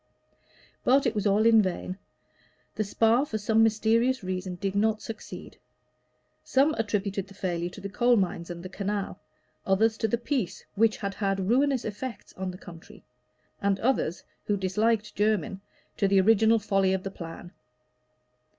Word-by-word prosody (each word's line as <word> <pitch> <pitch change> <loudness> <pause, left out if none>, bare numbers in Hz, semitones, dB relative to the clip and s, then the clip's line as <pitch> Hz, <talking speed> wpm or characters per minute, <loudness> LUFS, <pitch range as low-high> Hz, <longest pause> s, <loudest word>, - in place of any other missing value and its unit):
But 270 +2 +4
it 235 - +1
was 210 -1 0
all 205 +2 +3
in 225 -1 +7
vain. 185 0 -3 0.7
The 215 - -1
Spa, 225 +5 +3
for 230 -7 -3
some 220 +1 +2
mysterious 225 +3 +2
reason, 185 0 -3
did 195 +1 -3
not 215 +1 +2
succeed. 220 0 -9 0.8
Some 280 +4 +3
attributed 205 -4 -2
the 195 - -15
failure 175 -2 -2
to 190 - -11
the 200 - -5
coal 240 +4 +3
mines 175 -3 -1
and 170 0 -7
the - - -5
canal; 200 +1 -3 0.4
others 220 +3 +2
to 225 - +1
the 235 - 0
peace, 240 - -3
which 215 +1 +2
had 200 -1 -4
had 195 -2 -1
ruinous 265 +2 +2
effects 230 +4 -6
on 190 0 -4
the 180 - -7
country; 170 -2 -13 0.6
and 200 -1 +1
others, 220 -9 0 0.2
who 205 - +1
disliked 210 +3 0
Jermyn, 205 -3 0 0.4
to 200 - +2
the 195 0 +4
original 220 +3 +5
folly 195 -3 +1
of 190 -1 -2
the 195 - -4
plan. 170 -1 -9
205 Hz, 160 wpm, -27 LUFS, 190-225 Hz, 0.8 s, in